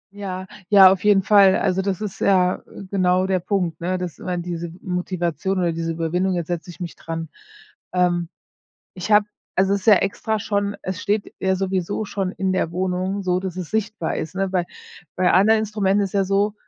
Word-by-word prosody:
Ja, 190 -2 -5 0.2
ja, 195 -2 +9
auf 190 -1 -1
jeden 205 -2 +4
Fall, 195 -2 +6
also, 190 -1 +1
das 190 -2 -2
ist 210 -3 -5
ja 185 -2 +3 0.3
genau 185 -1 +2
der 190 -1 +1
Punkt, 180 -2 -2
ne? 185 +2 -1
Dass 180 -3 -6
man 180 -1 -3
diese 170 -1 -5
Motivation 180 0 -2
oder 175 -2 +1
diese 165 0 -2
Überwindung: 175 +3 -1
„Jetzt 170 -2 -3
setze 175 0 -4
ich 175 - -11
mich 175 -2 -6
dran!“ 165 -1 -6 0.6
Ähm, 175 -2 +1 0.6
ich 185 +3 -5
habe 210 0 +6 0.3
also 190 +1 +3
es 200 - -1
ist - - -13
ja 215 - +9
extra 215 +3 -1
schon 205 -1 -1
es 185 +1 -4
steht 210 0 -1
ja 190 0 +1
sowieso 190 +2 -2
schon 195 -2 -3
in 190 -1 -1
der 175 -3 0
Wohnung, 185 +2 -1
so 180 -1 +1
dass 185 -2 -5
es 180 -3 -5
sichtbar 215 -5 -2
ist, 160 - -4
ne? 195 0 0
Bei 180 -2 0 0.5
bei 185 -1 +3
anderen 220 +3 +5
Instrumenten 205 -2 +1
ist 190 - -7
es - - -22
ja 200 -1 +2
so, 200 +2 +1
185 Hz, 200 wpm, -22 LUFS, 180-200 Hz, 0.6 s, ja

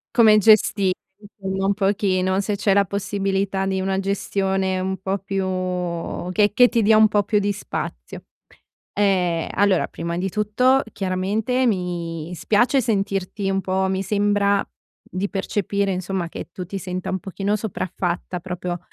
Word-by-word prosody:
Come 220 -3 +7
gestire 200 -2 +4 0.3
insomma 195 -2 -4
un 200 - +3
pochino, 195 -2 +1
se 205 +1 -1
c'è 200 -1 +2
la 200 0 +4
possibilità 195 -1 -1
di 190 0 0
una 190 0 0
gestione 195 -1 -1
un 190 +1 -2
po' 190 +2 -2
più 195 0 -2 0.9
che 205 +2 +3
che 245 +2 +6
ti 235 -1 +1
dia 215 +1 +5
un 215 0 +7
po' 205 0 +2
più 210 +1 +1
di 205 0 +1
spazio. - - -6 0.7
Ehm, 180 -5 +1
allora 200 -3 +2
prima 170 0 -5
di 190 +2 -1
tutto 250 +7 +2
chiaramente 205 +7 0
mi 175 -5 -2
spiace 240 - +2
sentirti 195 -2 -1
un 195 0 0
po', 190 0 0
mi 190 0 -1
sembra, 200 0 +2 0.5
di 190 +2 -3
percepire 200 0 -1
insomma 185 -1 -3
che 170 - -8
tu 180 -1 -6
ti 195 +3 -5
senta 185 0 -4
un 190 - -1
pochino 195 +3 -2
sopraffatta 180 -4 -3
proprio, 180 -1 -4
195 Hz, 150 wpm, -22 LUFS, 185-205 Hz, 0.9 s, Come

